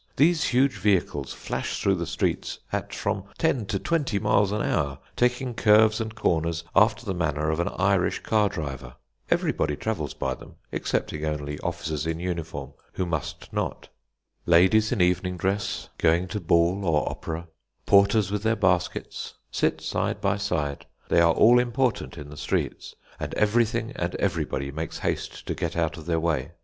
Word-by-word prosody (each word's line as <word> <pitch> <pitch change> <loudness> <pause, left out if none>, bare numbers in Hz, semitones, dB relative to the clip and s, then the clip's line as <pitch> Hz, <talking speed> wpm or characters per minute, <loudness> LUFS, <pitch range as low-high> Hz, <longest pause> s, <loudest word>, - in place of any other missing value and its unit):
These 155 +3 +4
huge 130 -3 +2
vehicles 90 -8 +1
flash - - -4
through 100 - +2
the 85 -3 -2
streets 85 - -1 0.2
at - - -2
from 100 - -2
ten 130 -10 +1
to 100 - -1
twenty 145 - 0
miles 100 0 +2
an 105 0 -1
hour, 70 -1 0 0.2
taking 125 +1 +1
curves 110 -1 +5
and 110 0 -4
corners 85 -4 0
after 105 +2 +4
the 100 - -1
manner 80 -3 0
of 80 - -2
an 85 - +1
Irish - - +2
car 105 -2 +2
driver. 70 -9 -6 0.3
Everybody 75 -1 +1
travels 80 -7 -3
by 65 - -1
them, - - -13 0.2
excepting 75 - -2
only 75 -1 -3
officers 80 0 -3
in 80 0 -2
uniform, 85 -6 -4 0.2
who 90 - -1
must 80 -4 -4
not. - - -3 0.6
Ladies 95 +6 +5
in 120 -7 +1
evening 90 +1 +1
dress, 95 +3 -2
going 85 +3 +3
to 105 - -3
ball 85 +2 +2
or 80 -5 +1
opera, 80 +2 -5 0.4
porters 100 0 +4
with 105 -1 -1
their 110 +1 +2
baskets, 90 -4 -1 0.2
sit - - 0
side - - -1
by 100 -1 +1
side. 80 -8 -2 0.2
They 85 - +5
are 85 -1 +5
all 120 +7 +6
important 125 -5 0
in 75 -1 -8
the 75 - -10
streets, - - -2 0.2
and - - -4
everything 110 +1 +2
and - - -2
everybody 70 +1 -1
makes 80 +2 -5
haste - - -3
to - - -2
get 85 0 -3
out 80 -2 0
of 80 -1 -10
their 85 -1 +1
way. 80 -2 -1
90 Hz, 170 wpm, -26 LUFS, 80-105 Hz, 0.6 s, all